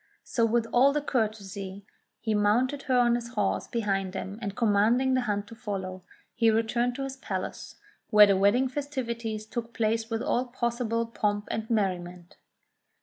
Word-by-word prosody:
So, 230 -3 +1
with 230 0 +1
all 275 +4 +4
courtesy, 200 -7 -3 0.3
he 220 -1 -1
mounted 235 +7 +2
her 255 - +4
on 240 -1 +4
his 240 +1 -3
horse - - 0
behind 195 -5 -1
him, 195 +2 -5
and 200 -3 -4
commanding 230 +4 +3
the 255 - +2
hunt 205 -3 -1
to 230 - -10
follow, 190 -4 -5 0.3
he 230 -1 +3
returned 235 +2 +1
to 275 - -3
his 270 0 -5
palace, - - -5 0.3
where 210 0 +9
the 200 -1 +3
wedding 205 +7 +3
festivities 235 -6 -4
took 230 +1 -5
place 225 0 0
with 225 +1 -2
all 255 -2 +1
possible 235 -2 -1
pomp 210 -2 -1
and 220 0 -3
merriment. 180 -5 -2
225 Hz, 160 wpm, -28 LUFS, 205-245 Hz, 0.3 s, where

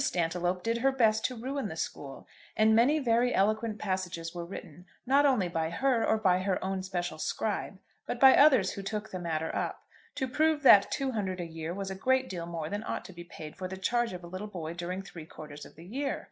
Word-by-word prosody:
Stantiloup 175 +1 0
did 230 +1 0
her 270 +3 +3
best 220 -4 +2
to 255 - -1
ruin 265 +1 -3
the 160 - -6
school, 140 -3 -6 0.3
and 220 0 +5
many 255 +7 +4
very 245 -3 +2
eloquent 215 +2 +1
passages 180 -4 -3
were 175 -1 -5
written 180 -1 -10 0.2
not 280 +3 +4
only 235 -10 +2
by 165 -2 -1
her 250 +6 +1
or 220 - +2
by 185 -4 +3
her 185 0 0
own 190 0 -2
special 175 -4 -4
scribe, 205 +2 -2 0.3
but 245 - -3
by 265 -1 +8
others 260 -10 +6
who 200 - -6
took 210 +2 -4
the 185 - -4
matter 160 -2 -2
up, - - -3 0.3
to 265 -2 -1
prove 310 +3 +1
that 200 -6 +8
two 275 -2 -1
hundred 190 -5 -2
a 175 - -3
year 165 0 -6
was 195 +1 -4
a - - -4
great 260 +6 +1
deal 170 -2 -5
more 165 -2 -4
than 205 +5 -3
ought - - -4
to 190 - -10
be 175 0 -9
paid 155 -3 -10
for 185 - -5
the 190 +1 -7
charge 240 +5 0
of 180 -1 -7
a - - -8
little 185 +4 -6
boy 170 -5 -6
during 180 +2 -4
three 165 -4 -10
quarters 150 -2 -10
of - - -19
the 165 - -13
year. 275 +8 -2
190 Hz, 230 wpm, -30 LUFS, 175-235 Hz, 0.3 s, by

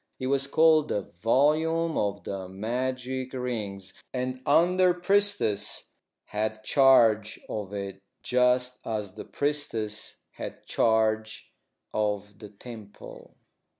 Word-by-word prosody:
It 130 - -3
was 140 +1 +1
called 155 +1 +5
the 100 - -1
"Volume 155 - +1
of 100 -2 -1
the 95 -1 -5
Magic 130 +5 -3
Rings," 110 -7 -4 0.2
and 130 0 -2
the - - -4
under 180 +4 +5
priestess 200 - +1 0.3
had 110 +1 -3
charge 115 -5 +4
of 105 -2 -5
it 100 -1 -5 0.2
just 125 0 +2
as 105 -4 -4
the - - -8
priestess 130 -8 -2 0.2
had - - -8
charge 110 -1 +1 0.4
of 105 -1 -2
the 105 - -10
temple. 105 0 -12
120 Hz, 115 wpm, -27 LUFS, 105-140 Hz, 0.4 s, called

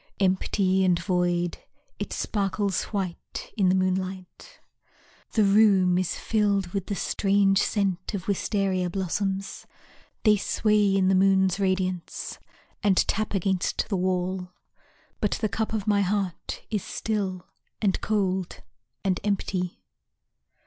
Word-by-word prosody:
Empty 190 0 +2
and 180 -2 +3
void, 175 -1 0 0.4
it - - -4
sparkles 200 -1 -1
white 190 -5 -5
in 195 -5 +3
the 185 - +3
moonlight. 185 - -3 0.7
The 220 - +4
room 195 -3 +5
is 185 - -1
filled 200 -4 +1
with 195 0 -3
the 205 - -2
strange 195 0 +2
scent 195 -2 -1
Of 185 -2 -5
wistaria 195 -2 0
blossoms. 195 +1 -3 0.6
They 215 -2 +5
sway 210 -1 +2
in 190 -1 +3
the 190 - +4
moon's 190 0 +3
radiance 185 -2 -2 0.4
And 195 -3 +3
tap 215 -1 -1
against 190 +1 0
the 205 - 0
wall. 185 0 -1 0.7
But 210 - +1
the 220 - 0
cup 220 +2 -2
of 215 -3 -2
my 205 -2 +3
heart 195 -3 -2
is 210 -3 0
still, 195 -5 -3 0.3
And 200 -3 +1
cold, 190 -4 -1 0.4
and 190 -2 +1
empty. 190 -3 -2
195 Hz, 125 wpm, -26 LUFS, 185-205 Hz, 0.7 s, room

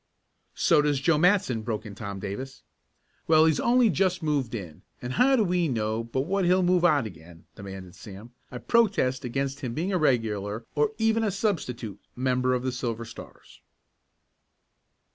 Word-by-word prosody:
"So 150 - +4
does 145 -2 +1
Joe 150 +2 +2
Matson!" 180 - +2
broke 110 0 -4
in 105 - -8
Tom 100 -2 -6
Davis. 105 +8 -7 0.6
"Well, 160 0 +6
he's 160 -2 +2
only 240 -2 +4
just 180 +2 0
moved 140 -6 -1
in, 85 -8 -8 0.2
and 125 +1 -5
how 265 - +4
do 230 - +3
we 180 -3 +1
know 110 -3 -1
but 115 +3 -2
what 190 +7 -1
he'll 180 +1 +3
move 180 0 +2
out 150 -8 +4
again?" 85 -3 -12
demanded 95 -2 -9
Sam. 105 +4 -11 0.2
"I 125 - -7
protest 165 - +1
against 135 +3 -3
him 125 -5 -5
being 180 +6 -2
a 180 - +1
regular, 110 -6 0
or 150 +8 +1
even 225 0 +2
a 215 - +1
substitute, 125 - -3 0.2
member 130 0 +1
of 125 - -3
the 130 - -1
Silver 115 -2 -4
Stars!" 115 - -13
130 Hz, 170 wpm, -26 LUFS, 110-175 Hz, 0.6 s, Well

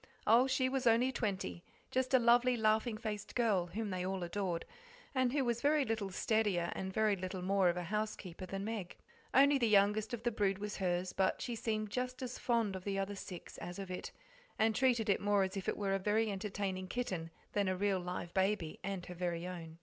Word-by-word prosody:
Oh, 235 +4 +6
she 260 0 +2
was 260 -1 0
only 235 +3 +4
twenty 195 -7 -3 0.3
just 255 0 0
a - - +9
lovely, 245 +1 +4
laughing 220 +1 +2
faced 210 -2 -5
girl, 210 -8 +2
whom 205 +4 -4
they 180 -1 -2
all 190 0 -2
adored, 175 -1 -2 0.5
and 255 -2 +2
who 275 -1 +1
was 235 -1 0
very 295 -1 +3
little 220 -4 -1
steadier 195 -3 +1
and 190 0 -4
very 215 +1 +2
little 185 0 -5
more 195 -1 +3
of 175 - 0
a 180 - -2
housekeeper 190 -2 -4
than 195 +2 -4
Meg. 210 -5 -4 0.4
Only 280 +1 +6
the 235 - +3
youngest 210 +1 +3
of 235 -2 -4
the 240 - +1
brood 200 -3 +1
was 210 0 -4
hers, 180 -1 -1
but 190 -1 +1
she 240 - -3
seemed 215 -2 -2
just 255 +2 -3
as 250 -1 -5
fond 230 -5 +1
of 185 - -6
the 195 0 -2
other 195 +1 -1
six 185 -3 -8
as 175 0 -6
of 195 -2 -6
it, 180 - -5 0.5
and 220 0 +3
treated 245 -4 +3
it 200 - +2
more 205 -1 +3
as 190 +1 -3
if 195 - -2
it - - -2
were 195 -2 0
a 195 - +1
very 210 +2 +1
entertaining 195 -2 -3
kitten 185 -7 -3 0.2
than 200 -2 +1
a 185 0 0
real 200 -1 +1
live 175 -1 -5
baby, 190 -4 0
and 195 -2 -3
her 180 - -7
very 175 -1 -2
own. 165 -3 -7
205 Hz, 220 wpm, -35 LUFS, 185-230 Hz, 0.5 s, a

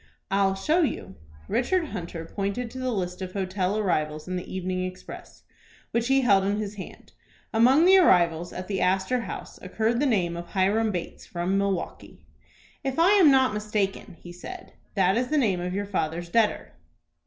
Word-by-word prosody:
"I'll 195 -1 +2
show 310 - +1
you." 295 - -2 0.3
Richard 330 +5 0
Hunter 170 -4 -6
pointed 200 +6 -3
to 260 - -7
the 255 0 -1
list 180 -4 -3
of 185 -1 -5
hotel 190 0 -1
arrivals 155 -7 -1
in 185 - -3
the 180 - -5
"Evening 185 0 -2
Express," 185 0 -9 0.5
which 235 0 0
he 270 0 +4
held 200 -6 +4
in 200 +1 0
his 210 -1 -4
hand. 200 -3 -10 0.4
Among 255 +8 +5
the 380 +1 +7
arrivals 175 - +3
at 185 0 -7
the 195 -2 -2
Astor 190 +7 +1
House 235 - -7
occurred 220 +5 -1
the 290 - +2
name 180 -8 +1
of 170 0 -7
Hiram 205 +4 +1
Bates, 175 -3 -6
from 175 +2 -2
Milwaukie. 195 -2 -3 0.6
"If 270 -1 -2
I 340 +4 +5
am 385 -7 +7
not 265 -4 +4
mistaken," 210 -3 -2
he 175 - -11
said, 365 - -10 0.2
"that 190 +1 +3
is 250 +1 0
the 305 - 0
name 205 -10 +2
of 180 +1 -3
your 205 +1 -2
father's 170 -3 -3
debtor." 225 +2 +1
195 Hz, 180 wpm, -26 LUFS, 185-240 Hz, 0.6 s, the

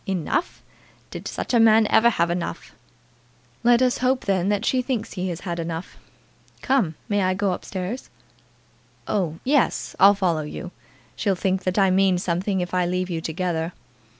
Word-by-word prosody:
"Enough! 195 - -2 0.5
Did - - -7
such - - -4
a 240 - +5
man 225 -1 +6
ever 235 +2 +6
have 170 -6 0
enough?" 175 0 -4 0.9
"Let 240 +1 +5
us 250 -1 +1
hope, 255 +1 +1
then, 190 -1 +1
that 205 +2 0
she 255 +1 +2
thinks 240 -3 -3
he 185 -1 -3
has 175 -1 -5
had 175 -3 -4
enough. 165 +1 -5 0.7
Come; 240 - +1
may 205 -1 +1
I 185 0 +1
go 200 0 0
up 180 - -4
stairs?" 190 +6 -5 1.0
"Oh, 175 -6 -1
yes. 275 0 +1
I'll 200 +1 +7
follow 175 -5 0
you. 165 +4 -7 0.4
She'll 200 -3 0
think 190 0 -1
that 185 +1 -1
I 195 -2 +4
mean 190 -1 +3
something 180 +2 -1
if 180 0 -5
I 180 -1 +1
leave 180 +1 -2
you 165 -1 -2
together." 165 0 -2
190 Hz, 175 wpm, -23 LUFS, 175-215 Hz, 1.0 s, I'll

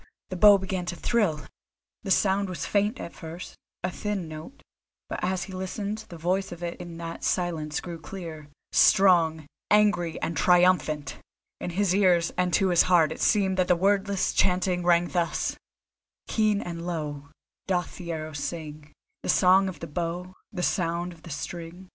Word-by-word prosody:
the - - -2
bow 205 +2 +8
began 190 -1 -3
to 175 0 -4
thrill! 180 -7 0 0.6
The 200 - -7
sound 195 0 +2
was 180 - -4
faint 210 +4 0
at 170 - -7
first, 165 +2 -9 0.3
a 180 - -1
thin 200 -3 -3
note, 155 - -10 0.4
but - - -4
as 185 0 0
he 190 - -9
listened 200 +3 -4
the 170 - -9
voice 185 +4 -1
of 175 0 -8
it 170 0 -5
in 170 -1 -8
that 165 0 -7
silence 160 -4 -1
grew 170 -2 -7
clear, 160 -2 -8 0.2
strong, 165 -5 +4 0.2
angry 205 -6 +3
and 165 - -3
triumphant. 175 -4 +3 0.4
In - - -4
his 185 +1 +1
ears 180 -4 +3
and 180 0 +1
to 195 -2 +2
his 175 -2 +5
heart 170 -4 +4
it - - -6
seemed 190 -3 +2
that 185 -1 +2
the 180 - +4
wordless 195 +1 +1
chant 180 -1 +2
rang 175 -1 +2
thus: 175 -2 -1 0.7
Keen 215 -2 +1
and 170 0 -6
low 150 -4 -4 0.4
Doth 180 -2 -1
the 170 -2 -6
arrow 155 -1 -5
sing 150 0 -6 0.3
The - - -5
Song 190 +1 +5
of 170 -5 -10
the 165 - -5
Bow, 175 +3 -4 0.2
The 180 -3 -4
sound 175 -1 -1
of 165 - -18
the 170 - -11
string. 170 +4 -7
175 Hz, 170 wpm, -26 LUFS, 165-190 Hz, 0.7 s, bow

